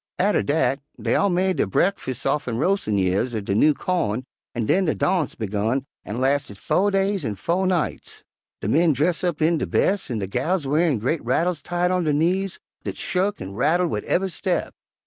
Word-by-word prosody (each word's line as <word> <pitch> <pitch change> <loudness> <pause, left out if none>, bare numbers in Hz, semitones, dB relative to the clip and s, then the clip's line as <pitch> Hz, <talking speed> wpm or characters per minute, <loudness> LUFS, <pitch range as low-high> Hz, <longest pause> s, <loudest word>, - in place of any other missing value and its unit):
Atter 195 +3 +2
dat, 145 -2 +1 0.2
dey - - 0
all 200 - +3
made 185 +1 +1
der - - +1
bre'kfus' 130 - -1
offen 135 -4 0
roas'in' 155 - +1
years 100 +6 +1
er 110 - -1
de 100 0 -2
new 150 +8 +4
cawn 130 - -1 0.3
an' 115 -2 -1
den 185 - +2
de 155 - +1
darnse 175 -7 0
begun 110 +5 -1 0.2
an' 110 +4 -5
lasted 135 -5 0
fo' 200 - +1
days 195 -2 0
an' 110 -5 -2
fo' 175 - 0
nights; 180 -4 -2 0.4
de - - -3
men 160 +7 +4
dress' 155 +6 0
up 170 -4 0
in 165 0 +3
der - - -2
bes' 195 -3 +1
an' 120 - -2
de 100 - -2
gals 140 - -1
wearin' 150 0 +2
gre't 135 +8 -1
rattles 165 +7 0
tied 175 +1 0
on 180 -1 +1
der 150 - +2
knees, 180 +5 0 0.2
dat - - -5
shuk 190 +3 -1
an' 95 +1 -6
rattled 160 - +2
wid - - -2
ev'y 190 +2 +1
step. - - -1
155 Hz, 200 wpm, -23 LUFS, 125-180 Hz, 0.4 s, new